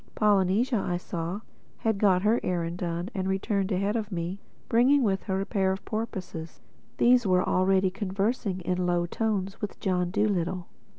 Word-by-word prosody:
Polynesia, 210 +4 +3
I 175 - -1
saw, 175 +3 -4 0.4
had 220 -3 0
got 190 -3 +4
her 220 +3 +3
errand 175 -1 -2
done 175 +2 -3
and 190 -2 -2
returned 195 +1 0
ahead 200 +3 0
of 215 -2 -2
me, 175 +2 -3 0.3
bringing 260 +4 +4
with 195 -3 +1
her 190 -1 -1
a - - -2
pair 195 -3 +1
of 190 - -5
porpoises. 185 -7 -5 0.4
These 245 -2 +4
were 185 -1 +3
already 190 0 +3
conversing 200 0 -1
in 180 +1 -1
low 175 -1 +1
tones 195 0 -2
with 210 - -5
John 180 -2 0
Dolittle. 185 -3 0
190 Hz, 165 wpm, -27 LUFS, 180-210 Hz, 0.4 s, got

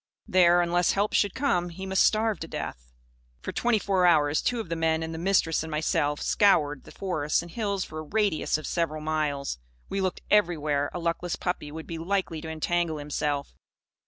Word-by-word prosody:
There, 175 -1 +5
unless 175 0 +2
help 205 +2 0
should 205 -2 +2
come, 180 -11 +1
he 190 +3 -7
must 190 0 +2
starve 220 -1 +2
to 165 - -6
death. - - -6 0.5
For - - -3
twenty 240 -2 +2
four 190 -3 +2
hours, 150 -3 +3
two 245 -1 0
of 220 - -4
the 165 - -2
men 160 0 +1
and 160 0 -5
the 160 - -5
Mistress 175 -3 +2
and 160 - -6
myself 150 -1 0
scoured 150 -9 +3
the - - -12
forests 155 -5 -1
and 175 - -11
hills 200 -2 -1
for 155 - -7
a - - -4
radius 195 -1 0
of 155 - -8
several 165 -3 -1
miles. 150 - -2 0.3
We 195 - -1
looked 185 -2 -2
everywhere 155 -8 +2
a - - -5
luckless 170 0 -2
puppy 175 -5 -3
would 160 +1 -7
be 165 -1 -6
likely 170 -2 -1
to 160 - -6
entangle 160 0 -1
himself. 145 -1 -2
165 Hz, 195 wpm, -27 LUFS, 155-190 Hz, 0.5 s, There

